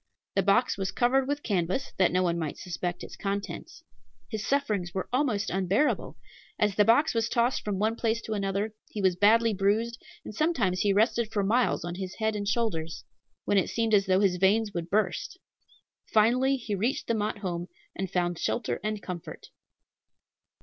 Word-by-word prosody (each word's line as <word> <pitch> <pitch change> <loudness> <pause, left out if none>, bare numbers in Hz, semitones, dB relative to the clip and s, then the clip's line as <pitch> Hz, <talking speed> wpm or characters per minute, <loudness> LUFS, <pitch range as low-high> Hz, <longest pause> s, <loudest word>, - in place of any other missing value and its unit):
The 195 - +2
box 200 +3 +2
was 190 - -1
covered 260 +2 +2
with 290 +1 -2
canvas, 190 +5 -1
that 185 - +4
no 185 +1 +2
one 170 -1 0
might 155 -3 -3
suspect 175 0 -4
its - - -9
contents. 195 -4 -5 0.5
His 215 -1 -3
sufferings 210 -11 -1
were 190 - -2
almost 250 -7 +1
unbearable. 195 +9 0 0.4
As 210 -1 +2
the 210 - +4
box 235 +8 +4
was 230 0 0
tossed 240 +2 +1
from 205 -2 -2
one 215 +3 +1
place 230 -1 0
to 220 - -4
another, 200 +1 -1 0.2
he 215 - -6
was 190 -3 +3
badly 220 +4 +4
bruised, 215 +4 0 0.2
and - - -7
sometimes 210 - +1
he 205 - +2
rested 220 +2 +2
for 205 -2 0
miles 230 -1 +1
on 175 - -4
his 185 +1 -6
head 220 -1 -1
and 205 -1 -3
shoulders, 195 -8 -1 0.4
when 200 - +3
it - - -1
seemed 225 -1 0
as 195 -2 +4
though 190 +1 +3
his 190 -3 +2
veins 205 +3 +2
would 170 -1 -4
burst. 205 - -1 0.7
Finally 250 +5 +4
he 230 -4 -5
reached 220 +7 -1
the 230 - 0
Mott 215 -1 -1
home, 175 -4 -4 0.3
and 190 -1 -3
found 175 -1 -1
shelter 235 - -1
and 215 -1 -3
comfort. 180 -3 -7
205 Hz, 185 wpm, -28 LUFS, 190-230 Hz, 0.7 s, that